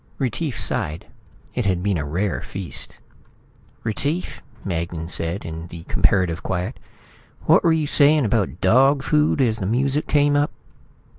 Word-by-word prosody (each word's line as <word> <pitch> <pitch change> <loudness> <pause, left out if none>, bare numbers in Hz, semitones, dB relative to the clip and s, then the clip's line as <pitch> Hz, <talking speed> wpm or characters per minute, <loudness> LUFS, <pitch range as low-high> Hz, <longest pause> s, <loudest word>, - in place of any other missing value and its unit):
Retief 130 +1 -2
sighed. 75 +2 -1 0.5
It 125 -5 -1
had 90 -2 0
been 100 -4 +1
a - - -2
rare 90 +7 -1
feast. 95 -2 -6 0.9
"Retief," 145 - -2 0.2
Magnan 85 -2 -3
said 85 +3 -2
in 80 +1 -6
the 85 -1 -9
comparative 90 -3 +1
quiet, 90 -1 -3 0.6
"what - - +5
were 165 - +4
you 160 -1 +2
saying 145 0 +4
about 100 - 0
dog 135 +8 +4
food 150 0 +2
as 115 -3 +1
the 95 - -2
music 135 +6 +1
came 145 -1 +3
up?" 145 +1 +2
105 Hz, 145 wpm, -22 LUFS, 85-140 Hz, 0.9 s, what